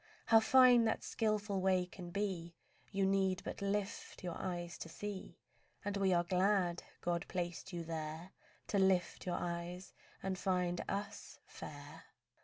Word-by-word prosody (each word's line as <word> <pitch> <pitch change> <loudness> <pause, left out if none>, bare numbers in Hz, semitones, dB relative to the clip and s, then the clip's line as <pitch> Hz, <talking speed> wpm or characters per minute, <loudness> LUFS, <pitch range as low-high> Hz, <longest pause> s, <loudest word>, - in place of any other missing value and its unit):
How 225 -1 +7
fine 245 0 +7
that 220 - 0
skilful 210 -3 0
way 185 -1 +3
can 180 0 -9
be 175 -3 -2 0.4
You 195 -1 +2
need 190 -1 +2
but - - -5
lift 200 -1 -2
your 175 -2 -3
eyes 175 -2 -4
to 165 - -6
see; 200 +3 -6 0.5
And 205 0 -1
we 195 -1 +3
are 175 -1 +4
glad 180 -1 +2 0.2
God 170 -1 0
placed 175 +1 -3
you 170 -2 -3
there 160 +2 -5 0.4
To 200 - +2
lift 190 -1 +2
your 175 - 0
eyes 175 +1 -4 0.3
and 190 -1 -2
find 180 -2 +1
us 205 +1 -4
fair. 150 +2 -9
185 Hz, 150 wpm, -36 LUFS, 175-200 Hz, 0.5 s, How